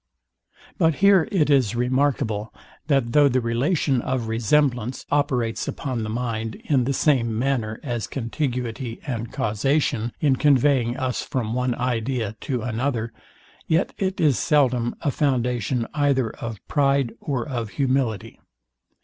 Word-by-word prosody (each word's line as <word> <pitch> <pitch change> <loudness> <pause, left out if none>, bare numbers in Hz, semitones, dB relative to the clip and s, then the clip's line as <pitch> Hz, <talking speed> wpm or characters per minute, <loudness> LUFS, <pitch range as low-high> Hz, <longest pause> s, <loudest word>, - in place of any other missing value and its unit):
But 165 -3 +3
here 195 -2 +5
it 155 -7 +2
is 125 -6 +3
remarkable, 125 -3 0 0.4
that 135 -6 +2
though 145 +2 +5
the 130 0 +2
relation 130 +3 +1
of 125 -3 -2
resemblance 120 +1 +1
operates 130 -6 0
upon 130 -4 -3
the 110 - -3
mind 115 -1 -3
in 135 -5 +2
the 135 - 0
same 120 -6 +2
manner 115 -4 -1
as 120 -7 -3
contiguity 125 - -3
and 115 -5 -4
causation, 115 +1 0
in 140 -4 +2
conveying 135 -4 +3
us 130 -1 -1
from 115 -4 -3
one 125 0 0
idea 120 -3 -2
to 125 -4 -2
another, 115 -1 -2 0.5
yet 165 +4 +1
it 190 -1 -1
is 145 -6 +3
seldom 130 -6 +2
a 145 - 0
foundation 125 -4 0
either 140 -5 +1
of 115 -4 -8
pride 140 -4 +2
or 135 -2 -3
of 120 -6 -3
humility. 130 -6 -1
125 Hz, 135 wpm, -23 LUFS, 115-140 Hz, 0.5 s, here